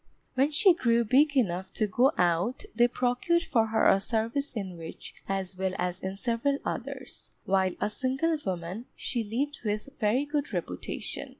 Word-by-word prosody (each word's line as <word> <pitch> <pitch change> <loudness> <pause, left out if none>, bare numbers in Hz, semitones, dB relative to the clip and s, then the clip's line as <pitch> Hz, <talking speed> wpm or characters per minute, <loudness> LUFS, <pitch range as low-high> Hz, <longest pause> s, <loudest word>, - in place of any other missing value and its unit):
When 270 +3 +3
she 335 +5 +5
grew 235 -6 +2
big 280 +5 +4
enough 190 -5 0
to 220 - +2
go 245 +7 +3
out, 180 - +1
they 240 0 +5
procured 250 +8 +1
for 225 -8 +2
her 220 0 +3
a 195 - +5
service 230 +6 -1
in 195 -7 -5
which 165 -1 -9 0.2
as 195 -1 -2
well 190 0 -1
as 180 0 -2
in 190 0 -4
several 240 +6 0
others, - - -5 0.2
while 190 -1 +2
a 205 - +1
single 265 +8 0
woman, 185 +5 -4
she 235 -2 -2
lived 275 +8 -2
with 210 +4 -2
very 240 +5 +2
good 290 -4 -2
reputation. 165 - -4
225 Hz, 170 wpm, -28 LUFS, 190-265 Hz, 0.2 s, she